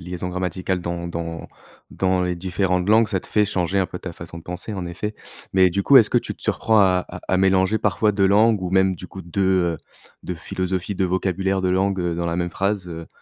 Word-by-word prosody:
liaisons 90 +1 -5
grammaticales 90 0 -2
dans 85 0 -4
dans 85 -1 -5 0.5
dans 95 -1 +1
les 90 0 -1
différentes 90 +1 -1
langues, 110 +1 +5
ça 95 -4 -1
te - - -15
fait 105 - +3
changer 95 -1 -1
un 95 - +2
peu 90 - -7
ta 90 - -6
façon 85 0 -9
de 85 - -12
penser, 90 +5 -6
en 90 -2 -4
effet, 100 +5 -5 0.4
mais 95 -1 +5
du 100 +3 -1
coup, 140 - +7
est-ce 110 - +4
que - - +4
tu - - -6
te - - -11
surprends 110 -1 +2
à 90 -2 +3
à - - -8
à 95 - +2
mélanger 95 +2 +3
parfois 105 +1 +1
2 100 -1 +2
langues 105 +1 +4
ou 90 - -3
même 95 -1 +3
du 90 - -9
coup, 95 +1 -10
2, 85 +3 -2 0.3
heu, - - -7 0.5
2 90 - -4
philosophies, 95 +3 -3
2 95 - +1
vocabulaires, 95 +1 -1
2 90 - +1
langues, 95 +1 +1
heu, 85 -1 -1
dans 85 - -2
la 85 - -1
même 90 -1 -1
phrase, 95 +1 -1
heu? 85 -1 -7
95 Hz, 240 wpm, -22 LUFS, 90-95 Hz, 0.5 s, coup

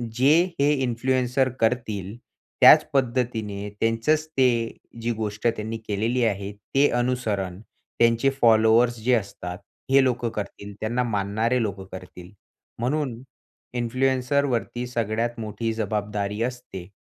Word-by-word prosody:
जे 135 +4 +5 0.3
हे 145 +1 +4
इन्फ्लुएन्सर 130 +1 +1
करतील, 110 -4 -1 0.5
त्याच - - +9
पद्धतीने, 115 -6 -1
त्यांचंच 115 +8 +1
ते 125 -6 +1 0.2
जी 120 - -1
गोष्ट 110 +1 -2
त्यांनी 115 -1 -2
केलेली 115 +4 0
आहे 100 -2 -2
ते 135 +8 +1
अनुसरण 110 -7 -1 0.4
त्यांचे 115 +3 +4
फॉलोवर्स 115 +1 +5
जे 125 - +3
असतात 90 -5 -2 0.3
हे 135 0 +6
लोकं 120 -2 0
करतील. 100 -1 -7
त्यांना 120 +3 0
मानणारे 110 +3 0
लोकं 100 -3 -3
करतील. 90 -1 -10 0.5
म्हणून 130 -1 -1 0.6
इन्फ्लुएन्सरवरती 125 0 0
सगळ्यात 115 0 -2
मोठी 110 +1 -3
जबाबदारी 105 -1 -2
असते. 120 -7 -6
115 Hz, 115 wpm, -24 LUFS, 105-125 Hz, 0.6 s, त्याच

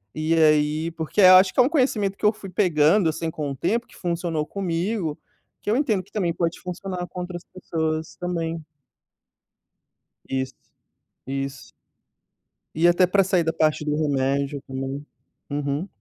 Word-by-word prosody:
e 155 +1 0
aí 155 0 +3
porque 165 +5 -1
eu 185 0 +9
acho 185 0 +6
que - - -2
é - - +9
um 260 - +2
conhecimento 220 -10 +1
que - - -3
eu 210 - +5
fui 195 -2 -10
pegando 175 -1 +3
assim 160 +1 -2
com 150 -3 -4
o - - -5
tempo 235 - 0
que - - -19
funcionou 170 -3 -2
comigo, 180 -2 -2 0.4
que 205 - -2
eu - - +3
entendo 225 -10 +1
que 200 - -25
também 180 -6 0
pode 170 0 -2
funcionar 180 0 -5
com 180 - -7
outras 175 -1 -6
pessoas 160 -3 -3
também. 165 -2 -3 1.7
Isso, 130 0 -2 0.7
isso. 135 0 -5 1.0
E 165 +2 +3
até 175 +1 +4
pra 195 +1 +3
sair 185 -2 +2
da 160 - -1
parte 155 -1 +1
do 150 0 0
remédio 140 -1 0
também. 135 +2 -5 0.4
Uhum. 145 +5 -2
165 Hz, 160 wpm, -24 LUFS, 150-185 Hz, 1.7 s, eu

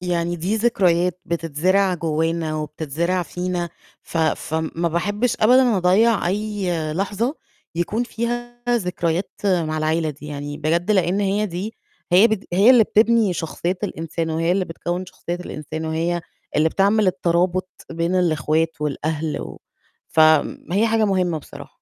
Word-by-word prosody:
يعني 175 -1 -1
دي 185 +6 -1
ذكريات 180 -6 +2
بتتزرع 170 +4 +1
جوّانا 160 0 -1
وبتتزرع 160 +4 -2
فينا 180 0 -3 0.3
ف 165 - -5
فم 160 0 -1
ما 170 +1 0
باحبّش 205 +8 0
أبدًا 245 -1 +5
أضيّع 190 +3 +3
أي 205 0 -2 0.2
لحظة 205 - -1 0.4
يكون 190 +7 -1
فيها 240 +1 -4
ذكريات 180 -5 0
مع 165 -5 +1
العيلة 155 0 0
دي 150 +1 -11
يعني، 145 0 -5
بجد 170 +5 0
لأن 190 -1 +2
هي 205 +1 +1
دي 195 +5 -5 0.4
هي 190 +6 +7
بت 215 -2 -2
هي 200 +7 +6
اللي 245 -4 +7
بتبني 220 -1 +3
شخصية 175 +2 -3
الإنسان، 165 -3 -3
وهي 165 +2 +1
اللي 190 0 +1
بتكوِّن 175 +2 -4
شخصية 175 -1 -6
الإنسان، 155 -2 -6
وهي 165 +2 -1 0.4
اللي 155 +1 +4
بتعمل 200 +4 +2
الترابط 180 0 +1 0.2
بين 170 +2 -1
الإخوات 165 -2 +1
والأهل 150 +1 -2
و - - -9 0.5
فم 155 +1 +3
هي 205 +4 +3
حاجة 225 -1 +2
مهمة 185 -5 +1
بصراحة. - - -12
175 Hz, 140 wpm, -21 LUFS, 160-200 Hz, 0.5 s, هي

